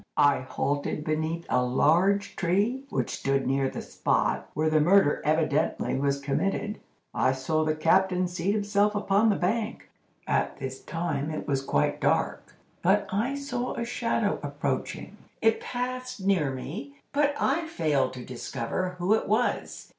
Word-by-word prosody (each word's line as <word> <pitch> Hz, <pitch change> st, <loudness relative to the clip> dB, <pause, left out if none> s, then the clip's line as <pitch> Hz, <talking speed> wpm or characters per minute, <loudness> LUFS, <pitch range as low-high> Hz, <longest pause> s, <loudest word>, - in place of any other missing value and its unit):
"I 145 Hz, -1 st, +5 dB
halted 145 Hz, +3 st, -2 dB
beneath 160 Hz, +2 st, -2 dB
a 125 Hz, -, +2 dB
large 175 Hz, +11 st, +2 dB
tree, 205 Hz, +10 st, 0 dB
which -, -, -1 dB
stood 135 Hz, 0 st, 0 dB
near 135 Hz, 0 st, +1 dB
the -, -, -6 dB
spot -, -, 0 dB
where 155 Hz, +2 st, +1 dB
the 155 Hz, -1 st, +3 dB
murder 180 Hz, -1 st, +4 dB
evidently 155 Hz, 0 st, +1 dB
was 140 Hz, +1 st, 0 dB
committed. 195 Hz, +9 st, -1 dB, 0.3 s
I 130 Hz, -, +2 dB
saw 155 Hz, +4 st, 0 dB
the 155 Hz, 0 st, 0 dB
captain 180 Hz, +3 st, +3 dB
seat 175 Hz, +2 st, -1 dB
himself 205 Hz, 0 st, +1 dB
upon 205 Hz, +2 st, +3 dB
the 205 Hz, -, +3 dB
bank. 215 Hz, +5 st, -2 dB, 0.3 s
At -, -, 0 dB
this 130 Hz, -1 st, -6 dB
time 160 Hz, -3 st, -2 dB
it 155 Hz, -, -5 dB
was 135 Hz, -2 st, +1 dB
quite 75 Hz, -, 0 dB
dark, -, -, 0 dB, 0.3 s
but 195 Hz, +3 st, +3 dB
I 230 Hz, +8 st, 0 dB
saw 280 Hz, -3 st, -3 dB
a 235 Hz, -, -2 dB
shadow 230 Hz, -3 st, 0 dB
approaching. 145 Hz, +7 st, -3 dB, 0.2 s
It 225 Hz, 0 st, +2 dB
passed 255 Hz, -1 st, -4 dB
near 190 Hz, -7 st, +2 dB
me, 140 Hz, +2 st, -6 dB, 0.2 s
but 290 Hz, 0 st, +2 dB
I 330 Hz, 0 st, +1 dB
failed 155 Hz, -, 0 dB
to 125 Hz, -1 st, -8 dB
discover 130 Hz, +8 st, -3 dB
who 180 Hz, +4 st, +2 dB
it 220 Hz, -, +1 dB
was. 220 Hz, +4 st, -1 dB
170 Hz, 155 wpm, -27 LUFS, 145-210 Hz, 0.3 s, I